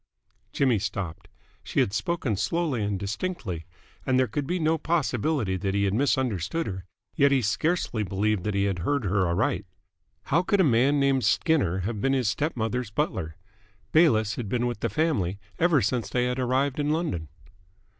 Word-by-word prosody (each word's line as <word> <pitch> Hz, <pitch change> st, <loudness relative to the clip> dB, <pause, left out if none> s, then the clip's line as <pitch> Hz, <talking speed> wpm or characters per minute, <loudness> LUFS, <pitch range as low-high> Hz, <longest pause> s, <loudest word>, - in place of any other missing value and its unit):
Jimmy 130 Hz, -6 st, +2 dB
stopped. 95 Hz, -4 st, -4 dB, 0.4 s
She -, -, -2 dB
had 100 Hz, -, +2 dB
spoken 160 Hz, -, -1 dB
slowly 140 Hz, -, -1 dB
and 100 Hz, -1 st, -1 dB
distinctly, 100 Hz, -, -4 dB, 0.4 s
and 130 Hz, -1 st, +1 dB
there 130 Hz, -, +4 dB
could 135 Hz, +5 st, -3 dB
be 180 Hz, +3 st, 0 dB
no 160 Hz, -1 st, +1 dB
possibility 140 Hz, -, 0 dB
that 95 Hz, +1 st, -2 dB
he 100 Hz, -, +2 dB
had 100 Hz, -1 st, +1 dB
misunderstood 125 Hz, -, 0 dB
her, 95 Hz, -3 st, -5 dB, 0.3 s
yet 140 Hz, 0 st, +4 dB
he 135 Hz, -3 st, +3 dB
scarcely 125 Hz, -, 0 dB
believed 100 Hz, 0 st, 0 dB
that 105 Hz, -2 st, -1 dB
he 100 Hz, -, +2 dB
had 100 Hz, -3 st, -1 dB
heard 140 Hz, +9 st, 0 dB
her 95 Hz, -1 st, +1 dB
aright. 85 Hz, 0 st, 0 dB, 0.6 s
How 160 Hz, +5 st, +2 dB
could 200 Hz, +2 st, +1 dB
a -, -, +6 dB
man 135 Hz, +1 st, +3 dB
named 135 Hz, -2 st, +2 dB
Skinner 105 Hz, -, +2 dB
have 105 Hz, +2 st, -3 dB
been 135 Hz, +3 st, +2 dB
his 130 Hz, -4 st, +1 dB
step 150 Hz, +6 st, -1 dB
mother's 115 Hz, +1 st, -2 dB
butler? 95 Hz, -, -2 dB, 0.6 s
Bayliss 110 Hz, -10 st, +3 dB
had 115 Hz, -5 st, -4 dB
been 120 Hz, +2 st, 0 dB
with 120 Hz, -1 st, -2 dB
the -, -, -1 dB
family 110 Hz, -, 0 dB, 0.2 s
ever 165 Hz, -7 st, +4 dB
since 110 Hz, -1 st, -1 dB
they 125 Hz, -1 st, +1 dB
had 125 Hz, +1 st, -1 dB
arrived 130 Hz, +3 st, 0 dB
in 145 Hz, 0 st, 0 dB
London. 150 Hz, -, -1 dB
120 Hz, 180 wpm, -26 LUFS, 100-145 Hz, 0.6 s, a